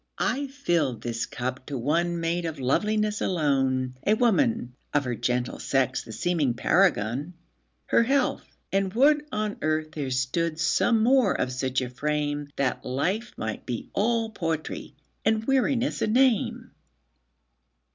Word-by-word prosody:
I 280 +1 0
filled 170 - -1
this 120 0 -2
cup 130 +1 -5
to 140 - -3
one 170 +7 0
made 170 +1 -1
up 160 - -4
of - - -13
loveliness 210 +10 +1
alone,A 135 0 +1
woman, 230 - +2 0.2
of 145 - +3
her 125 -2 -2
gentle 125 +1 -1
sex 135 -2 0
the 115 - -10
seeming 145 +1 0
paragon—Her 120 - 0
health! 265 +2 +1 0.3
and 195 -1 +1
would 295 +4 +4
on 215 -1 -2
earth 155 0 0
there 145 -4 -4
stood 155 +6 -1
some 225 +6 +3
more 250 -4 +3
of 125 - 0
such 130 +1 -1
a 125 - -3
frame, 145 +1 -2
That 135 -2 -1
life 185 - -2
might 110 -1 -5
be 120 -2 -5
all 225 +2 +1
poetry, 165 -6 -4 0.3
and 220 0 +1
weariness 270 -1 +1
a - - +2
name. 245 -1 +2
155 Hz, 140 wpm, -26 LUFS, 130-215 Hz, 0.3 s, would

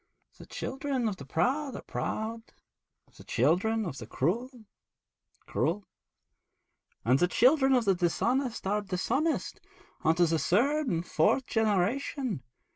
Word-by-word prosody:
The - - -12
children 270 -3 -2
of 200 -3 -2
the 140 - -10
proud 265 - 0
are - - -7
proud; 225 +1 -3 0.8
the - - -12
children 190 - +1
of 140 -6 -5
the 110 - -8
cruel, 195 - -1 1.0
cruel; 190 +4 -1 1.2
and 125 +4 +4
the 175 - +4
children 265 - +4
of 245 -2 +2
the 195 - +4
dishonest 235 +9 0
are 205 +2 +1
dishonest, 225 - -1 0.4
unto 165 +2 +4
the 165 -1 +1
third 275 - +2
and 170 -5 -1
fourth 185 +13 +2
generation. 220 - 0
215 Hz, 125 wpm, -29 LUFS, 175-260 Hz, 1.2 s, and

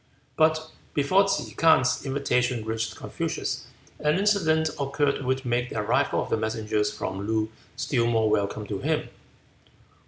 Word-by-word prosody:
But 155 0 +2 0.2
before 185 +8 +4
Ke 195 - -1
K'ang's 160 -6 +4
invitation 125 -4 0
reached 110 0 -2
Confucius - - -3 0.3
an 150 +2 +2
incident 165 -6 +2
occurred 140 0 0
which 130 +1 -1
made 120 0 0
the - - -5
arrival 105 - +1
of - - -9
the - - +3
messengers 110 -1 -1
from 100 -1 -4
Loo 110 0 0 0.2
still 125 -2 0
more 115 -2 +2
welcome 105 0 0
to 100 -1 -4
him. - - -1
125 Hz, 145 wpm, -26 LUFS, 110-150 Hz, 0.3 s, before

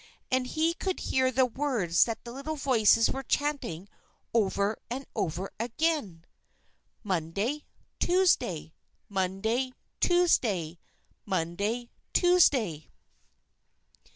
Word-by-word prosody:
And 255 0 +1
he 320 +5 +1
could 375 +1 -3
hear 260 0 +1
the 260 +1 +3
words 240 - +1
that 230 -1 -5
the 235 - -8
little 280 +5 -5
voices 230 -6 +4
were 270 - -3
chanting 270 - -2 0.5
over 205 -1 +1
and 265 +3 -4
over 180 +3 -2
again: 235 - -1 0.8
"_Monday! 200 - -2 0.3
Tuesday! 345 - +2 0.4
Monday! 205 +7 -1 0.3
Tuesday! 215 - +2 0.4
Monday! 200 +6 -2 0.2
Tuesday! 265 - +3
235 Hz, 95 wpm, -29 LUFS, 190-280 Hz, 0.8 s, voices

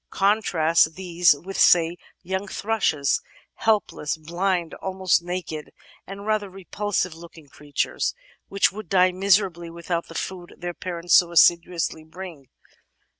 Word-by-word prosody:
Contrast 170 -6 +2
these 175 -3 +3
with, 190 +7 -7
say, 170 -1 +5 0.3
young 190 +2 -3
thrushes 195 -10 0 0.2
— - - -28
^helpless, 200 -8 0
blind, 175 +1 -1
almost 190 -2 0
naked, 175 -3 -5 0.4
and 195 +1 -8
rather 215 -2 0
repulsive 190 -1 -3
looking 165 -2 -14
creatiures, 145 +1 -2 0.3
which 195 0 +2
would 210 -3 -9
die 185 -1 +4
miserably 185 -2 +1
without 170 0 -4
the 165 - -12
food 180 -1 -6
their 175 0 -5
parents 175 -1 -3
so 175 -2 +6
assiduously 170 -1 +3
bring. 160 -4 -10
175 Hz, 125 wpm, -24 LUFS, 165-195 Hz, 0.4 s, so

